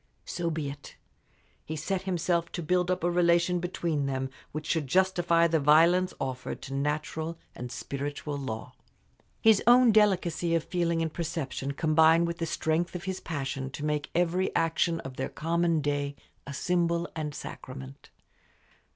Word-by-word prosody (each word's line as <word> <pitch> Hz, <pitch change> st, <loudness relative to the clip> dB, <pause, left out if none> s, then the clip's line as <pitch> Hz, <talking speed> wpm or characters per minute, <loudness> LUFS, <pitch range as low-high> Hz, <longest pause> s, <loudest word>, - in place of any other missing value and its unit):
So 170 Hz, -1 st, -2 dB
be 155 Hz, -3 st, -2 dB
it. 145 Hz, +1 st, -9 dB, 0.7 s
He 160 Hz, -, -5 dB
set 180 Hz, +5 st, -2 dB
himself 170 Hz, -1 st, 0 dB
to 175 Hz, -, -3 dB
build 180 Hz, +2 st, +1 dB
up 185 Hz, -2 st, 0 dB
a 175 Hz, -, +2 dB
relation 175 Hz, 0 st, +3 dB
between 170 Hz, -5 st, -1 dB
them 130 Hz, -1 st, -2 dB, 0.2 s
which 155 Hz, 0 st, -5 dB
should 155 Hz, -3 st, 0 dB
justify 175 Hz, +1 st, +3 dB
the 165 Hz, -1 st, +2 dB
violence 170 Hz, +5 st, +5 dB
offered 130 Hz, -1 st, -4 dB
to 135 Hz, -, -6 dB
natural 155 Hz, +3 st, -2 dB, 0.2 s
and 125 Hz, 0 st, -7 dB
spiritual 145 Hz, +3 st, -4 dB
law. 125 Hz, -6 st, -5 dB, 0.7 s
His 220 Hz, -2 st, +6 dB
own 245 Hz, 0 st, +7 dB
delicacy 180 Hz, -5 st, +2 dB
of 165 Hz, -, +1 dB
feeling 170 Hz, -2 st, 0 dB
and 160 Hz, -1 st, -3 dB
perception 140 Hz, -4 st, -3 dB
combined 160 Hz, +3 st, +4 dB
with 170 Hz, 0 st, -4 dB
the 165 Hz, -, -1 dB
strength 160 Hz, +3 st, -1 dB
of 175 Hz, -, -5 dB
his 190 Hz, -1 st, -3 dB
passion 135 Hz, -4 st, -4 dB
to 145 Hz, +2 st, -6 dB
make 150 Hz, -1 st, -1 dB
every 175 Hz, +2 st, +2 dB
action 165 Hz, 0 st, +1 dB
of 130 Hz, -1 st, -9 dB
their 130 Hz, -, -2 dB
common 165 Hz, 0 st, 0 dB
day 145 Hz, -1 st, -1 dB, 0.3 s
a 140 Hz, -, -5 dB
symbol 170 Hz, +1 st, +1 dB
and 150 Hz, -2 st, -4 dB
sacrament. 65 Hz, 0 st, -9 dB
165 Hz, 160 wpm, -28 LUFS, 145-175 Hz, 0.7 s, own